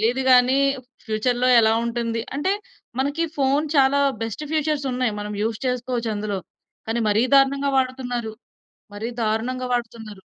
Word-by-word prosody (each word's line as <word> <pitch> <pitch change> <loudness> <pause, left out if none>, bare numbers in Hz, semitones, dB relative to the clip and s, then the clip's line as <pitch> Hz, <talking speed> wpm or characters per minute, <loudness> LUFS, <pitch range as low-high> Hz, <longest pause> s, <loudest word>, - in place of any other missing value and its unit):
తెలీదు 240 +4 +1
గాని 255 +1 +5 0.5
ఫ్యూచర్‌లో 245 +3 0
ఎలా 220 0 +4
ఉంటుంది 230 -1 -2
అంటే 290 +7 0 0.5
మనకి 285 +5 0
ఫోన్ 280 +2 +2
చాలా 275 +1 +4 0.2
బెస్ట్ 225 +6 -4
ఫీచర్స్ 305 -2 0
ఉన్నాయి. 250 -2 0
మనం 210 0 -5
యూజ్ 220 0 -1
చేసుకోవచ్చు 245 -2 -2
అందులో. 205 -1 -3 0.5
కానీ 235 +1 0
మరీ 210 +2 +3
దారుణంగా 275 +1 +4
వాడుతున్నారు. 245 -3 -2 0.6
మరీ 220 +3 -4
దారుణంగా 235 +4 -1
వాడుతున్నారు. 225 -4 -4
245 Hz, 135 wpm, -23 LUFS, 225-265 Hz, 0.6 s, గాని